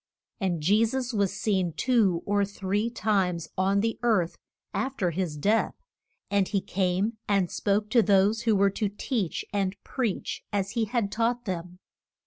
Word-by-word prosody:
And 180 -6 -1
Je 205 +7 +4
sus 250 +2 -1
was 200 -3 +1
seen 190 -6 0
two 205 -9 +2
or 205 0 +2
three 200 +2 -1
times 195 -7 0
on 195 +2 +2
the 225 +1 -1
earth 210 -8 +2 0.4
af 270 +1 -2
ter 180 -3 +1
his 170 -3 -2
death, 210 +9 +1 0.6
and 200 -2 +3
he 205 - 0
came 190 +4 0
and 195 -4 +2
spoke 210 +1 0
to 235 - +6
those 205 +1 +3
who 225 -2 +2
were 200 0 +4
to 210 +1 -1
teach 205 -2 -2
and 195 -1 0
preach 240 -7 -3
as 200 -1 -1
he 230 -1 0
had 215 -2 -1
taught 235 +2 0
them. 180 -2 -4
200 Hz, 165 wpm, -27 LUFS, 190-225 Hz, 0.6 s, to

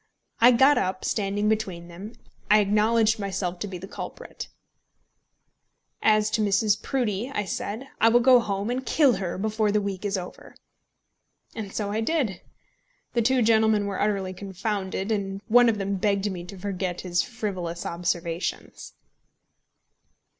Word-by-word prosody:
I 240 +1 +8
got 265 +4 +5
up, 185 0 -2
and - - -4
standing 205 0 0
between 195 -6 -1
them, 190 +6 -9 0.4
I 210 - +7
acknowledged 215 +2 +2
myself 190 -3 -3
to 205 - -3
be 190 -2 -6
the 185 +2 -9
culprit. - - -8 1.5
"As 215 -1 +3
to 220 - +1
Mrs. 205 +1 +2
Proudie," 240 -3 -1
I 210 -6 -2
said, 220 +7 -4
"I 225 - +6
will 240 +1 +5
go 250 0 +6
home 205 0 -2
and 255 +1 -2
kill 275 -2 +3
her 180 -3 -3
before 215 +1 0
the 210 - +2
week 200 -2 -4
is 205 -1 -1
over." 180 -1 -9 1.0
And 210 -3 -6
so 205 -1 -3
I 215 +2 -1
did. 225 - -1 0.7
The 235 - +2
two 255 +2 +3
gentlemen 220 -2 +3
were 200 -1 -3
utterly 195 -3 0
confounded, 195 +1 -3
and 195 -2 -2
one 240 +1 +6
of 220 - 0
them 200 0 -2
begged 200 +1 0
me 175 -2 -6
to 195 +2 -10
forget 185 -2 -3
his 175 -2 0
frivolous 185 -8 -4
observations. 170 0 -3
205 Hz, 155 wpm, -25 LUFS, 190-220 Hz, 1.5 s, I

